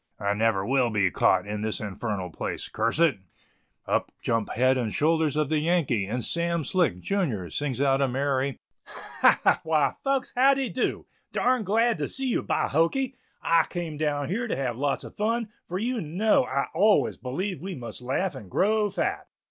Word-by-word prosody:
"I 100 0 0
never 105 -2 +1
will 130 0 +2
be 100 -4 +1
caught - - +3
in 105 0 -4
this 110 0 -1
infernal 100 -3 -4
place, - - -4
curse - - -1
it;" 160 -10 +3 0.7
up - - 0
jump 115 -2 0
head 130 +3 +3
and 120 -4 -1
shoulders 160 +1 +1
of 155 -2 0
the 155 -1 +2
Yankee, 150 - +1
and 120 +3 -3
Sam 170 -1 0
Slick, 145 - +1
junior, 120 - -1
sings 135 - -2
out 135 -1 +3
a 135 - +3
merry 135 0 -1 0.3
"Ha! - - +1
ha! - - +4
why, 155 -2 +1
folks, 275 -1 0
how 270 +2 +5
de 270 -3 -1
dew. 245 - -2 0.3
Darn 250 -2 +1
glad 225 +4 +2
to - - -2
see 265 -1 -2
you, - - +1
by - - 0
hokey; 245 - +1 0.3
I 165 -1 +4
came 170 -4 -4
down 145 -1 -1
here 230 +6 -1
to - - -1
have 130 -3 -2
lots 140 +3 -1
of - - -11
fun, 225 +1 -1 0.2
for 180 - -3
you 235 +3 -1
know 180 +1 +2
I 140 +2 -1
always 210 +1 +3
believe 180 +9 -3
we 190 0 -5
must 120 -3 -8
laugh 135 +10 -1
and 100 - -10
grow 210 - +2
fat." 200 - -2
150 Hz, 190 wpm, -26 LUFS, 125-195 Hz, 0.7 s, how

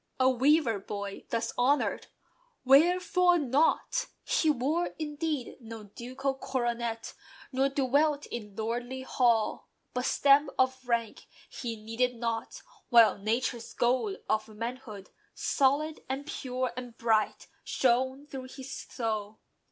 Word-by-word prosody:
A 260 - +5
"weaver 260 -3 +3
boy" 200 0 -6
thus 230 0 -1
honoured! 275 +4 +2 0.6
Wherefore 355 +5 +5
not? 305 - +1 0.2
He 425 -11 +2
wore, 300 +6 0
indeed, 300 -3 -3
no 225 -1 -8
ducal 255 +6 -4
coronet; 240 -4 -3 0.4
Nor 265 +1 +2
dwelt 285 +2 +2
in 210 -4 -7
lordly 240 +4 -3
hall. 235 -4 +1 0.2
But 250 0 -1
"stamp" 280 +1 +4
of 260 -1 +1
"rank" 230 -2 -1 0.2
He 235 -3 -5
needed 225 +3 -1
not, 230 - -3 0.3
while 230 -4 +6
Nature's 230 +3 -2
"gold" 240 -5 +1
of 215 0 0
manhood, 220 -2 -7 0.2
Solid, 295 +3 +1
and 270 +2 -3
pure, 255 -4 -3
and 245 -2 -7
bright, 220 -2 +1 0.2
shone 260 +2 +1
through 265 -3 -7
his 270 0 -8
soul. 215 -3 -4
255 Hz, 120 wpm, -29 LUFS, 230-275 Hz, 0.6 s, while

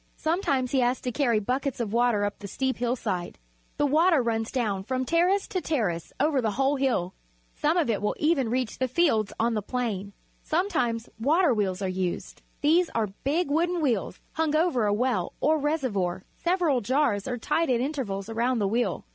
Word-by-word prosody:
Sometimes 290 -7 0
he 270 - +2
has 250 +1 +2
to 250 - -2
carry 240 -3 +2
buckets 255 +5 -1
of 220 -3 -2
water 235 -3 +2
up 205 - -4
the 200 - -7
steep 265 +6 -2
hillside. 225 -7 -2 0.4
The 290 - +2
water 320 +3 +4
runs 225 -1 -1
down 210 -7 -1
from 255 +4 -2
terrace 360 +6 +2
to 370 - -2
terrace 200 - -1
over 285 -2 +2
the 225 - +1
whole 275 +1 +2
hill. 240 -9 0 0.4
Some 315 +4 +1
of 335 - +2
it 220 -4 0
will 210 - 0
even 300 -6 +2
reach 250 -1 -2
the 260 - +1
fields 255 - +2
on 230 +1 +2
the 215 - -1
plain. 205 -4 -3 0.3
Sometimes 250 - 0
water 305 +4 +3
wheels 195 -3 -1
are - - 0
used. 185 -1 -3 0.2
These 330 +4 +3
are 215 -4 0
big 300 +3 0
wooden 345 +3 +1
wheels 235 - -1
hung 315 -1 0
over 310 -9 +2
a - - +2
well 215 -5 0
or 310 +1 +2
reservoir. 230 - -1 0.2
Several 345 -7 +2
jars 230 -4 +1
are 250 -1 -2
tied 325 +7 0
at 245 -2 +2
intervals 240 -8 -3
around 235 +3 0
the 205 -3 +1
wheel. 235 +4 -1
250 Hz, 190 wpm, -26 LUFS, 215-300 Hz, 0.4 s, water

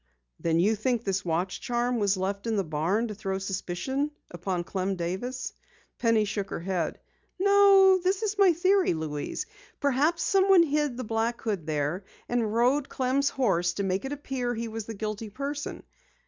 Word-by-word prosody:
"Then 165 0 +1
you 210 +6 +3
think 235 +2 0
this 195 -2 -1
watch 175 +2 -2
charm 240 0 0
was 200 -2 +2
left 200 +3 -3
in 225 - 0
the 200 - +1
barn 170 +8 0
to - - -4
throw 195 -2 -3
suspicion 195 +9 -2 0.2
upon 175 0 -3
Clem 190 +2 -2
Davis!" 190 +9 -4 0.5
Penny 230 -2 +3
shook 205 -1 -3
her - - -4
head. 175 -3 -2 0.4
"No, 390 -1 +6
this 375 +3 +1
is 425 -1 0
my 390 -2 +7
theory, 370 - +2
Louise. 150 -2 -4 0.3
Perhaps 290 +4 +2
someone 385 -2 +5
hid 295 -4 0
the 255 - -3
black 225 +1 -1
hood 200 -8 -3
there, 155 +5 -1 0.2
and 235 -3 0
rode 255 +5 +2
Clem's 270 +2 +1
horse 175 -9 +1
to 200 - -2
make 190 0 -1
it 270 - -4
appear 265 -4 -3
he 230 +1 -3
was 225 -1 -5
the 225 - -6
guilty 215 +1 -4
person. 280 +6 -5
225 Hz, 175 wpm, -27 LUFS, 190-275 Hz, 0.5 s, my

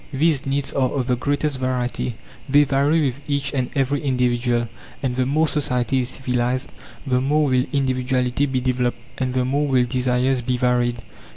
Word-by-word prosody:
These 145 -1 +1
needs 140 0 -1
are 130 -2 +2
of 130 -1 -2
the 125 0 +1
greatest 145 +2 -1
variety; 125 -2 -2 0.3
they 145 +2 +6
vary 145 +3 +2
with 135 +1 -2
each 140 0 -1
and 130 -3 -1
every 140 0 +1
individual; 120 -3 +1 0.4
and 125 -2 0
the 130 0 0
more 155 +4 +2
society 130 -3 0
is 125 -1 -2
civilized, 125 0 -1 0.3
the 125 -2 +1
more 150 +3 +2
will 130 -2 +2
individuality 130 0 0
be 130 -2 -1
developed, 125 -1 0 0.2
and 130 -1 -1
the 125 -1 +2
more 140 +3 0
will 130 -3 +3
desires 125 +1 +1
be 125 +1 -1
varied. 120 -1 +1
130 Hz, 175 wpm, -22 LUFS, 125-140 Hz, 0.4 s, they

